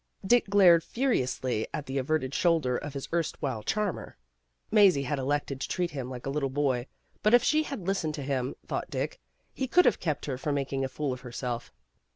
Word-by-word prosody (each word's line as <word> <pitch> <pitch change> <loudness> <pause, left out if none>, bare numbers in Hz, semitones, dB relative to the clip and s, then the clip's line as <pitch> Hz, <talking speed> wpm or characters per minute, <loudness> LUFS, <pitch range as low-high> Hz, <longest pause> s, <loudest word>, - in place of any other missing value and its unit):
Dick 240 +3 +4
glared 180 -5 +6
furiously 130 - 0
at 145 - -4
the 135 +1 -2
averted 135 0 -1
shoulder 160 -8 +2
of 145 +2 -5
his 135 - -4
erst 170 -2 -1
while 130 -6 -2
charmer. 205 - -2 0.5
Mazie 195 -9 +5
had 140 +1 -2
elected 140 0 -1
to - - -2
treat 175 -2 -1
him 130 -3 -5
like 125 -2 -7
a 135 - -2
little 140 -1 -1
boy, 130 -2 0 0.3
but 215 +3 +5
if 245 - +4
she 305 0 +3
had 275 - -5
lis 195 +1 0
tened 155 -1 -2
to 145 - -5
him, 130 -2 -2
thought - - -3
Dick, - - -3 0.3
he 265 - -2
could 360 +7 +5
have - - +3
kept 155 -4 -2
her 130 -3 -3
from 145 +1 -1
making 135 -1 -1
a 135 - -1
fool 140 0 -2
of 125 - -8
herself. 125 -1 -5
145 Hz, 210 wpm, -28 LUFS, 130-180 Hz, 0.5 s, glared